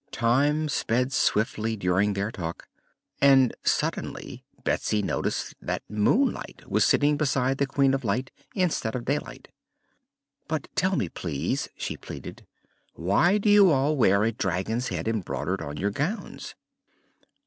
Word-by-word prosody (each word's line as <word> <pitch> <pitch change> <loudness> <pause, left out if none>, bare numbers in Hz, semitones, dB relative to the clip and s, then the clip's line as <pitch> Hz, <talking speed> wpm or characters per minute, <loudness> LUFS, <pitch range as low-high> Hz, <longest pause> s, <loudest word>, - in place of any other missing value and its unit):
Time 145 +6 +2
sped 125 -2 0
swiftly 110 -1 +1
during 100 +1 +1
their 100 +2 -2
talk 85 -6 -6 0.5
and 135 -3 +6
suddenly - - -2 0.2
Betsy 105 -1 0
noticed - - -2
that - - -3
Moonlight 105 - 0
was - - +2
sitting 145 0 +3
beside 135 -2 +1
the 140 - +2
Queen 135 0 +2
of 135 0 -1
Light, 120 +5 -1 0.2
instead 170 - 0
of 120 - -4
Daylight. 145 +2 -3 1.0
"But - - -3
tell - - +1
me, - - 0
please," 80 - -3
she - - -4
pleaded, - - -9 0.5
"why 100 - +3
do 210 - -2
you 205 -2 +7
all 145 0 +2
wear 100 -6 +4
a 115 - +2
dragon's 105 +4 -2
head - - -3
embroidered 110 -5 -2
on 75 +1 -6
your 100 +5 0
gowns?" 155 - -4
125 Hz, 135 wpm, -26 LUFS, 105-140 Hz, 1.0 s, you